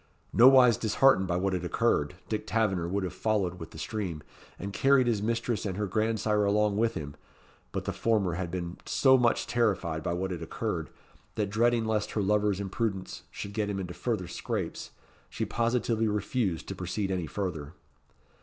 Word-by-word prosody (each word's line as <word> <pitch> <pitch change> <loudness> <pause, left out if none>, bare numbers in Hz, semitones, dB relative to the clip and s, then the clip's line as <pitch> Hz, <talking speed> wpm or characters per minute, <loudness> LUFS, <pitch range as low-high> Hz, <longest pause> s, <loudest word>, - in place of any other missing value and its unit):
Nowise 125 -1 +7
disheartened 110 -3 +3
by 90 - 0
what 95 +1 0
had 90 -2 -2
occurred, 85 -1 +1
Dick 110 0 -3
Taverner 105 -7 +1
would 95 +2 -1
have 90 -1 -3
followed 95 -5 -1
with 80 - -8
the - - -12
stream, 95 -9 -4 0.3
and 100 +2 -6
carried 135 +1 +4
his 115 -4 +1
mistress 115 +1 -1
and 95 -3 -3
her 105 - 0
grandsire 110 +1 +1
along 105 0 +2
with 115 +1 +1
him; 75 -1 -6 0.6
but - - -4
the - - -2
former 105 -6 +1
had 90 0 -3
been 85 0 -4
so 130 -1 +5
much 120 -2 +2
terrified 95 -9 0
by 85 - -2
what 95 +2 -2
had 85 -2 -4
occurred, 80 - -3 0.5
that 105 -3 -1
dreading 115 +1 +2
lest 110 -1 -1
her 105 - 0
lover's 105 -1 +2
imprudence 100 -1 -3
should 100 - -7
get 105 -1 -1
him 100 -1 -2
into 90 -2 -5
further 110 -6 -2
scrapes, 90 - -4 0.4
she - - -3
positively 115 -1 0
refused 105 -3 -1
to 100 - -5
proceed 95 +2 -3
any 90 -4 -2
further. 80 -3 -4
100 Hz, 180 wpm, -29 LUFS, 90-110 Hz, 0.6 s, Nowise